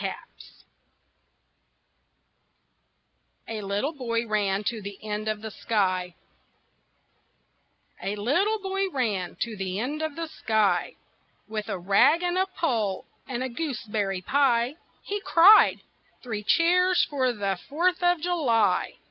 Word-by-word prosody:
KNAPP'S] - - -8 2.8
A 220 -1 -5
LITTLE 205 +10 -2
BOY 235 -4 -2
RAN 205 -2 0
TO 220 +1 -3
THE 200 0 -8
END 210 +1 -3
OF 215 0 -3
THE 220 - -5
SKY 185 -5 -1 1.9
A 200 - -3
little 350 - +1
boy 390 0 -1
ran 215 - -2
to 230 -2 -2
the 190 -1 -4
end 290 +7 -3
of 315 -2 -3
the 330 - -3
sky 220 -8 0 0.5
With 215 0 -5
a 195 - -2
rag 200 - +3
and 355 0 0
a 380 - +1
pole 230 - -1 0.2
and 255 -1 -3
a 260 - -3
gooseberry 220 - -3
pie. 250 +2 +2 0.3
He 410 0 -4
cried: 390 +2 +6 0.4
"Three 220 -4 -4
cheers 360 - +3
for 260 -3 0
the 200 -5 -2
Fourth 355 +6 +1
of 355 -1 +3
July!" 240 - +1
235 Hz, 125 wpm, -26 LUFS, 205-325 Hz, 2.8 s, cried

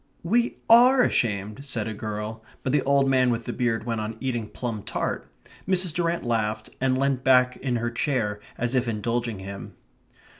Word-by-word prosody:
"We 235 +8 +1
ARE 250 +3 +7
ashamed," 105 - 0
said 120 -6 -2
a 110 - -3
girl. 110 +1 -5 0.2
But 130 - 0
the 145 - +4
old 140 0 +3
man 130 -1 +3
with 115 -1 -1
the - - -3
beard 120 -3 0
went 115 -1 -2
on 110 +1 -5
eating 120 -5 -3
plum 115 -4 -4
tart. - - -4 0.4
Mrs. 185 -3 +3
Durrant 170 0 -1
laughed 110 -2 -1
and 130 -1 +2
leant 135 -1 0
back 125 -1 +4
in 130 -2 -2
her 120 0 -1
chair, 115 -5 -1 0.2
as 120 +1 -1
if 130 -1 +1
indulging 115 0 -2
him. 95 +1 -8
120 Hz, 180 wpm, -25 LUFS, 110-135 Hz, 0.4 s, ARE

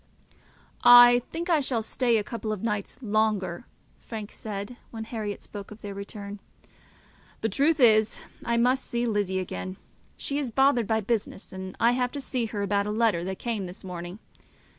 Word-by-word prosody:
"I 245 0 +9
think 335 +2 -3
I 335 -4 +4
shall 255 -5 -1
stay 235 +1 +1
a 210 - 0
couple 220 0 -4
of 215 -2 -4
days 210 -3 -2
longer," 210 -5 0 0.3
Frank 215 -3 -7
said, 205 +2 -6
when 225 -1 -6
Herriot 215 -3 -5
spoke 200 -2 -8
of 215 +1 -12
their 200 -1 -5
return. 200 0 -7 1.0
"The 225 - +1
truth 295 +9 +2
is 220 -3 +5 0.2
I 235 -1 0
must 255 +3 +3
see 240 0 -2
Lizzie 205 -4 0
again. 185 0 -4 0.4
She 280 +1 -2
is 275 -4 -2
bothered 250 -2 +3
by 220 0 +1
business, 210 -3 -3
and 190 0 -7
I 235 - +5
have 250 0 0
to 285 - -3
see 255 -3 -1
her 205 -2 -3
about 200 0 +1
a - - -1
letter 215 -6 +2
that 190 0 -4
came 220 -6 -3
this 180 - -11
morning. 175 0 -6
220 Hz, 180 wpm, -27 LUFS, 200-240 Hz, 1.0 s, I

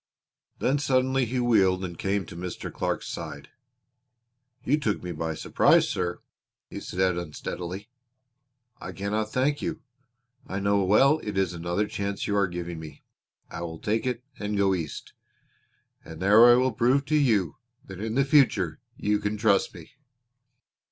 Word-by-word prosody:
Then 140 +3 +1
suddenly 130 -1 +2
he 125 +2 -2
wheeled 95 -6 +3
and 85 -1 -7
came 95 +2 -1
to 80 - -11
Mr. 90 +1 -6
Clark's - - -2
side. 75 -4 -7 1.1
"You 145 +4 +2
took 110 -8 -1
me 90 - -4
by 80 0 -3
surprise, - - +3
sir," 85 -1 -3 0.5
he - - -5
said 90 -1 0
unsteadily. 90 +4 -6 0.9
"I 90 - -7
cannot 105 +3 -2
thank 140 +3 +1
you. 170 -2 -4 0.6
I 95 - -3
know 100 0 +2
well 135 +11 +4
it 105 -7 -5
is 95 -2 +1
another 85 +4 -1
chance 100 -1 -3
you 100 - -1
are 100 -2 +3
giving 85 -1 -5
me. 75 -3 -11 0.5
I 85 - -6
will 80 -1 -5
take 110 +7 -1
it 125 -1 -2 0.2
and 105 0 -2
go 100 -1 +3
East, 80 -6 -5 0.9
and 80 -1 -10
there 105 +6 +7
I 120 - +8
will 130 +1 +2
prove 130 +5 +2
to 155 - 0
you 110 - +2 0.3
that 95 0 -9
in 110 +1 -3
the 140 0 +3
future 110 - +3 0.2
you 105 0 +1
can 105 +1 -2
trust 105 -2 +2
me." - - -12
100 Hz, 160 wpm, -26 LUFS, 90-120 Hz, 1.1 s, I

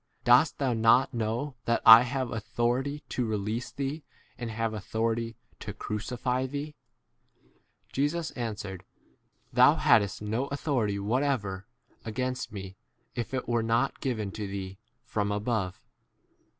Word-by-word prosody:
Dost 125 +5 +5
thou 135 -3 +1
not 115 +4 +4
know 120 +5 -2
that 115 - +2
I 115 +1 +12
have 125 0 -2
authority 120 +5 -1
to 125 - -1
release 110 +1 -2
t 140 +4 -4
thee 145 +3 -3 0.3
and 120 -2 -5
have 115 0 -2
authority 115 +2 -2 0.2
to - - -6
crucify 125 +4 -2
thee? 145 +3 -5 0.7
11 - - -37
Jesus 155 +4 0
answered, 105 -6 -5 0.2
7 - - -34 0.5
Thou - - +7
hadst 100 -3 +3
no 115 +6 -1
authority 130 -8 -1
whatever 105 -3 -1 0.4
against 125 +3 -3
me 95 -2 -8 0.4
if 120 - -4
it 130 -1 -3
were 120 -1 +1
not 115 +4 +1
given 110 -8 -2
to 105 0 -5
thee 95 0 -6 0.2
from 105 -3 -1
above. 105 -3 -1
115 Hz, 135 wpm, -28 LUFS, 105-130 Hz, 0.7 s, I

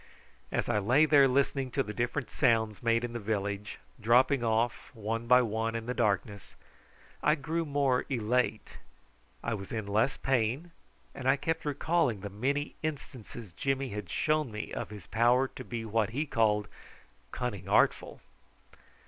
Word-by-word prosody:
As - - -1
I 105 - +2
lay 125 +10 +4
there 145 -3 +6
listening 135 0 +1
to - - +3
the 105 - -6
different 120 +4 -2
sounds 110 -5 +2
made 115 0 +2
in 120 -1 -4
the 120 - -3
village 100 -1 -3 0.2
dropping 125 +4 +4
off 115 +1 0
one 115 +2 -3
by 125 +1 +6
one 115 0 -2
in 115 -1 -3
the 125 - -2
darkness, 100 -3 -1 0.7
I 150 - +4
grew 165 +2 -2
more 140 -3 +1
elate. 115 -3 -1 0.6
I 115 - -1
was 100 -2 -6
in 110 -2 -3
less 110 +6 +1
pain, 130 +6 0 0.4
and 130 - -5
I 135 - +5
kept 160 +3 -2
recalling 145 - +1
the 100 0 -6
many 140 +8 -1
instances 125 - -6
Jimmy 135 +6 -1
had 105 -4 -6
shown 155 - 0
me 105 0 -6
of - - -4
his 105 -2 -10
power 120 +3 +3
to 130 - -9
be 115 -2 -5
what 110 -1 +1
he 140 +7 -2
called 105 -5 +1 0.6
"cunning 100 -6 -4
artful." - - +2
120 Hz, 160 wpm, -30 LUFS, 110-135 Hz, 0.7 s, there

